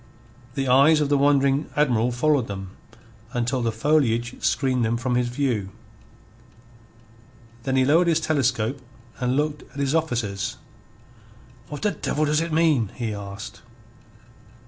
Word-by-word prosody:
The 135 -2 -1
eyes 140 +5 +5
of 150 -2 0
the 145 - +3
wondering 140 0 +2
Admiral 125 -5 +2
followed 135 0 +1
them 95 -2 -6 0.6
until 125 +1 -1
the 115 -1 0
foliage 120 -1 +1
screened 130 -3 +1
them 115 +1 0
from 125 +1 -2
his 120 0 +1
view. 120 -6 -1 2.0
Then 135 -1 0
he 130 -1 +3
lowered 165 +6 +4
his 165 -1 +3
telescope 135 -5 0 0.4
and 125 0 0
looked 150 0 -1
at - - -14
his 140 0 0
officers. 120 - -1 1.1
"What 145 +4 -7
the 210 - +2
devil 155 -2 -1
does 150 +1 +1
it 165 0 -3
mean?" 155 - +2
he 115 -4 -3
asked. 100 0 -8
130 Hz, 140 wpm, -24 LUFS, 120-150 Hz, 2.0 s, eyes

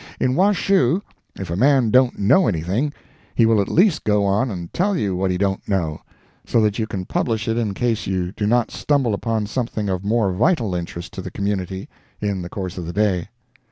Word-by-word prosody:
In 130 - +1
Washoe, 190 -2 +2 0.3
if 95 -4 -6
a - - -1
man 130 +1 +3
don't 130 0 +4
know 135 - +4
anything, 95 - 0 0.4
he 115 - +4
will 110 -2 +4
at 100 - -2
least 185 -1 +3
go 105 -1 +2
on 105 +7 +1
and 90 -5 -6
tell 195 +1 +1
you 100 - -1
what 95 +1 0
he 90 - 0
don't 95 0 -1
know, 85 -6 -1 0.4
so - - +1
that 105 -1 +1
you 110 - -1
can 95 -4 -4
publish 115 +2 -1
it 115 - +1
in 110 -4 -1
case 115 -1 -1
you 90 -2 -1
do 105 +1 -2
not 120 +1 +2
stumble 140 -6 +1
upon 110 +1 -1
something 110 -2 -3
of 95 0 -2
more 105 -2 +1
vital 115 - +1
interest 85 +1 -5
to 95 - -5
the 95 - -6
community, 95 -1 -3 0.3
in 100 -3 -2
the 85 - -6
course 95 -1 -5
of 85 - -6
the 85 - -5
day. 95 -4 +1
105 Hz, 210 wpm, -21 LUFS, 95-120 Hz, 0.4 s, don't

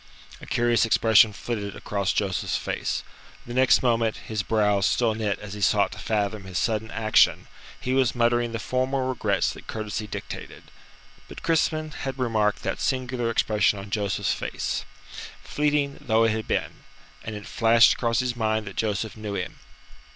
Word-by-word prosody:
A - - -10
curious 120 -2 +2
expression 110 -1 +5
flitted 105 -2 -4
across 100 -2 -1
Joseph's 95 -3 -1
face. - - -3 0.4
The 120 - -7
next 130 +1 +4
moment, 115 -2 +1
his 110 -2 -4
brows 105 -2 +2
still 115 -3 +2
knit 105 -2 -1
as 100 -1 -9
he 105 - -7
sought 100 +1 +3
to - - -9
fathom 105 -2 -1
his 95 -1 -5
sudden 110 -1 0
action, 110 -1 +3 0.3
he 130 - -2
was 130 -2 +2
muttering 120 0 +2
the 115 - -3
formal 130 +4 -1
regrets 130 0 0
that - - -13
courtesy 110 0 -4
dictated. 100 - -7 0.6
But - - -11
Crispin 155 -1 +1
had 135 -2 -5
remarked 110 -5 0
that - - -3
singular 125 -2 -1
expression 105 -2 +2
on 100 0 -9
Joseph's 100 -1 0
face - - -3 0.6
fleeting 145 -1 0
though 110 -1 +2
it 115 - +3
had 110 0 -3
been - - -2 0.4
and 110 - -5
it 105 0 -8
flashed 115 0 +5
across 115 0 0
his 125 -1 -2
mind 110 -2 0
that 95 - -9
Joseph 105 -1 -1
knew 105 -2 -5
him. 90 -1 -5
110 Hz, 165 wpm, -25 LUFS, 105-120 Hz, 0.6 s, expression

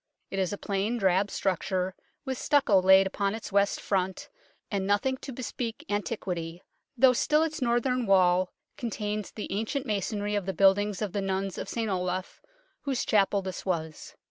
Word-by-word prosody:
It 195 - -2
is 185 -2 0
a 205 - -3
plain, 205 +4 -1
drab 195 -1 +2
structure, 185 -1 -1 0.3
with 260 -2 -3
stucco 235 -10 +4
laid 190 +1 +7
upon 200 +1 -1
its 225 - -7
west 200 0 +2
front, 190 -1 -2 0.4
and 195 -2 -1
nothing 205 +6 +2
to 270 - -8
bespeak 235 -2 -5
antiquity, 180 -5 -3 0.3
though 255 +1 +6
still 300 +5 +3
its 315 -3 -3
northern 240 0 +1
wall 185 -1 +4 0.3
contains 210 -5 -3
the 215 - -7
ancient 225 +7 -2
masonry 205 -1 -2
of 205 -2 -1
the 190 - -1
buildings 200 +2 +3
of 205 - -3
the 200 - -1
nuns 195 0 -2
of - - -5
St 230 -1 -2
Olave, 185 -1 -1 0.5
whose 270 -3 -1
chapel 200 -1 +2
this 185 -1 -5
was. 160 -4 -4
200 Hz, 170 wpm, -28 LUFS, 190-225 Hz, 0.5 s, laid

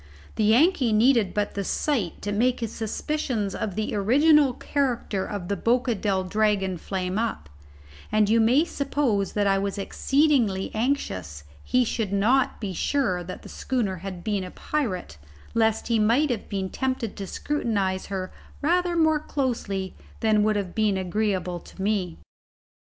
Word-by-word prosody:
The 215 - 0
Yankee 255 - +4
needed 225 -3 +4
but 205 0 -1
the 200 - -2
sight 220 - -1
to 205 - -2
make 245 +5 +1
his 230 -1 -3
suspicions 225 -2 -2
of 200 -4 -3
the 215 0 -2
original 280 +7 +4
character 245 -7 -1
of 200 -4 -5
the 200 - 0
Boca 240 +5 +1
del 195 -3 0
Dragon 195 -1 +1
flame 185 +2 -2
up; 225 - -3 0.6
and 215 -1 +3
you 225 +2 +4
may 255 +8 +4
suppose 275 - -1
that 205 -1 +1
I 195 -1 +3
was 200 +1 -2
exceedingly 240 -2 +1
anxious 95 - -2 0.2
he 250 0 +2
should 220 -3 -2
not 230 +7 +2
be 200 -4 -4
sure 190 -5 0
that 185 +1 -8
the - - -10
schooner 225 -8 -2
had 185 -1 -7
been 205 -3 -1
a 185 - -6
pirate, 185 - -3 0.3
lest 225 -1 +1
he 230 -2 +2
might 245 +7 +3
have 225 -4 -4
been 190 -2 -3
tempted 260 -4 -2
to 195 - -6
scrutinize 200 -8 -1
her 190 -2 -4 0.3
rather 350 +3 +1
more 315 -2 +3
closely 230 -10 -2 0.3
than 215 -2 +3
would 215 0 +2
have 195 -4 -2
been 215 -3 +1
agreeable 185 -1 -1
to - - -16
me. 190 -4 -1
215 Hz, 160 wpm, -25 LUFS, 195-255 Hz, 0.6 s, Yankee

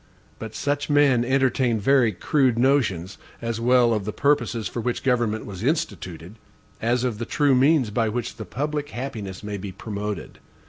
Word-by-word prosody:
But 110 -1 -7
such 145 +1 -1
men 145 -5 +4
entertain 130 -2 +1
very 125 +1 +4
crude 125 - +1
notions, 115 -9 +1 0.2
as 115 -1 -3
well 120 -1 +4
of 105 -2 -1
the 105 - -3
purposes 125 -5 +1
for 120 - -4
which 120 +1 -2
government 120 -4 +1
was 95 -2 -8
instituted, 100 - -3 0.4
as 120 +2 +1
of 120 -4 -2
the - - -2
true 145 +2 +2
means 130 -2 +3
by 115 +1 +1
which 120 +2 -4
the - - -6
public 145 +1 -3
happiness 110 -8 -6
may 105 -1 -4
be 100 0 -6
promoted. 105 0 -6
120 Hz, 170 wpm, -24 LUFS, 105-135 Hz, 0.4 s, men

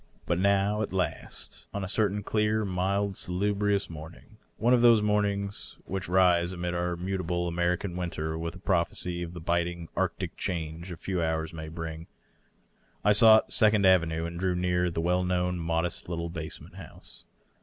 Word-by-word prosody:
But 85 -1 0
now, 100 +2 +2
at 110 - -2
last, 95 -1 -3
on 100 - -2
a - - -3
certain 105 0 0
clear, 105 0 +1
mild, 100 +1 -1
salubrious 100 +2 0
morning 80 +7 -11
— - - -41
one. 120 +3 +3
of 125 - +4
those 120 -2 +7
morning 100 -1 +1 0.3
which 95 -2 -4
rise 90 -1 +4
amid 90 -1 -3
our 85 0 -1
muta 95 +2 -3
ble 85 0 -1
American 85 +2 -1
winter 80 -3 -3
with 85 +1 -4
a - - -8
prophecy 85 -1 0
of 85 0 -5
tiae 85 -2 -9
biting, 85 -1 -1
arctic - - -2
change 85 0 -4
a 85 - -6
few 90 0 -2
hours 80 -1 -1
may 80 -1 -7
bring 80 0 -6 0.5
— - - -35
^I 105 0 +5
sought 110 0 +7
Second 105 -2 +4
Avenue 85 -3 +3
and 85 0 -6
drew 95 -1 0
near 90 0 +1
the 80 -1 -2
well 90 +2 +1
known 90 0 0
modest 85 +1 -2
little 85 -1 -3
basement 80 -2 -7
house. - - -12
90 Hz, 175 wpm, -28 LUFS, 85-100 Hz, 0.5 s, those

